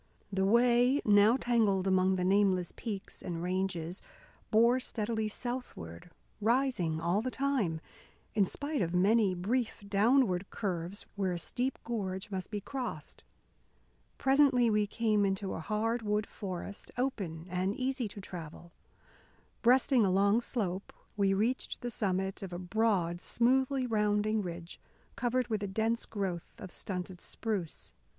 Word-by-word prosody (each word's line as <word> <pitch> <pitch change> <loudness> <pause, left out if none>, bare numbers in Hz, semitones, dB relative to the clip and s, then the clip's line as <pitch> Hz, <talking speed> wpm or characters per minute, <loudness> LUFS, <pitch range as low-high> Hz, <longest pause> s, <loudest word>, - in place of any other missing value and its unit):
The 190 0 +2
way, 240 +5 +4
now 210 +3 +6
tangled 220 -7 +2
among 190 0 +3
the 180 - -1
nameless 190 -2 +2
peaks 205 -5 -6
and 170 -1 -4
ranges, 180 -1 -2 0.5
bore 235 +3 +5
steadily 220 -2 -1
southward, 215 - -6 0.3
rising 225 -9 +1
all 170 +5 +1
the 255 - -2
time, 255 -12 0 0.5
in 210 - +4
spite 285 +8 -2
of 175 -1 -1
many 200 +1 +4
brief 215 +5 -1
downward 205 -2 +3
curves 185 -2 -3
where 190 -3 0
a - - -2
steep 250 +9 -2
gorge 200 -4 -3
must 185 -2 -4
be 210 - -3
crossed. 245 - -6 0.9
Presently 265 -4 +4
we 210 -1 +2
came 215 -1 +1
into 195 0 -1
a - - -4
hard 220 +7 -1
wood 210 0 0
forest, 195 0 -7
open 195 -11 -2
and 185 +3 -1
easy 260 -2 -1
to 205 +1 -9
travel. 170 -2 -9 0.9
Breasting 250 0 +5
a 195 - +3
long 200 +4 +3
slope, 195 -6 -3 0.2
we 195 -1 +2
reached 230 +6 -1
the 245 - -3
summit 190 -2 -1
of 195 -2 -6
a 175 - -4
broad, 180 -2 0
smoothly 260 +2 +2
rounding 210 -1 +1
ridge 175 -2 -7 0.4
covered 245 0 0
with 215 -2 -1
a 205 - -2
dense 220 +4 0
growth 190 -5 -4
of 190 -6 -9
stunted 180 -1 -5
spruce. 205 -8 -4
205 Hz, 140 wpm, -32 LUFS, 185-235 Hz, 0.9 s, now